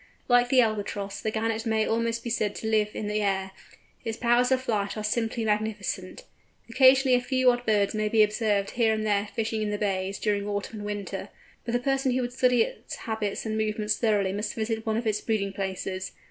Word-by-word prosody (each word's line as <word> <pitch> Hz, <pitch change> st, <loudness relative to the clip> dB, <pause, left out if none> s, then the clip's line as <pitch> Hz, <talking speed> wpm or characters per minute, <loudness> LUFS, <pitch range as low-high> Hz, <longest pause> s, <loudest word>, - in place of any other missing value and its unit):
Like 245 Hz, 0 st, +4 dB
the 255 Hz, -1 st, +6 dB
Albatross, 205 Hz, -3 st, -2 dB
the 220 Hz, -, -1 dB
Gannet 220 Hz, 0 st, -1 dB
may 220 Hz, -1 st, +2 dB
almost 230 Hz, 0 st, -1 dB
be 235 Hz, -, -4 dB
said 215 Hz, -3 st, 0 dB
to 220 Hz, -, -5 dB
live 215 Hz, -1 st, +2 dB
in -, -, -3 dB
the 210 Hz, +1 st, -1 dB
air. 190 Hz, -1 st, 0 dB, 0.5 s
Its 225 Hz, -1 st, -3 dB
powers 245 Hz, +1 st, +3 dB
of 260 Hz, -, +4 dB
flight 210 Hz, -5 st, -1 dB
are 215 Hz, -, -3 dB
simply 225 Hz, +1 st, -1 dB
magnificent. 210 Hz, -3 st, -2 dB, 0.4 s
Occasionally 260 Hz, +2 st, +5 dB
a 245 Hz, -, +2 dB
few 255 Hz, 0 st, +3 dB
odd 245 Hz, 0 st, -4 dB
birds 205 Hz, -2 st, +2 dB
may 215 Hz, 0 st, 0 dB
be 220 Hz, 0 st, +5 dB
observed 210 Hz, -2 st, 0 dB
here 225 Hz, -2 st, +2 dB
and 215 Hz, 0 st, -2 dB
there 205 Hz, -1 st, +1 dB
fishing 220 Hz, -1 st, -1 dB
in 210 Hz, -, -1 dB
the 205 Hz, -, -1 dB
bays, 195 Hz, -1 st, -1 dB
during 205 Hz, -1 st, -1 dB
autumn 205 Hz, +1 st, -4 dB
and 205 Hz, -, -6 dB
winter; 205 Hz, -1 st, -5 dB, 0.4 s
but 235 Hz, -, -3 dB
the 245 Hz, -, +2 dB
person 270 Hz, 0 st, +1 dB
who 255 Hz, -, +1 dB
would 245 Hz, 0 st, -3 dB
study 250 Hz, -2 st, +4 dB
its -, -, -7 dB
habits 220 Hz, -2 st, -3 dB
and 220 Hz, 0 st, -2 dB
movements 215 Hz, -1 st, 0 dB
thoroughly 205 Hz, -4 st, +1 dB
must 210 Hz, +1 st, -3 dB
visit 225 Hz, 0 st, -3 dB
one 220 Hz, 0 st, +1 dB
of 235 Hz, -, -2 dB
its 215 Hz, -1 st, 0 dB
breeding 200 Hz, -3 st, -1 dB
places. 190 Hz, -1 st, -4 dB
220 Hz, 215 wpm, -27 LUFS, 205-230 Hz, 0.5 s, the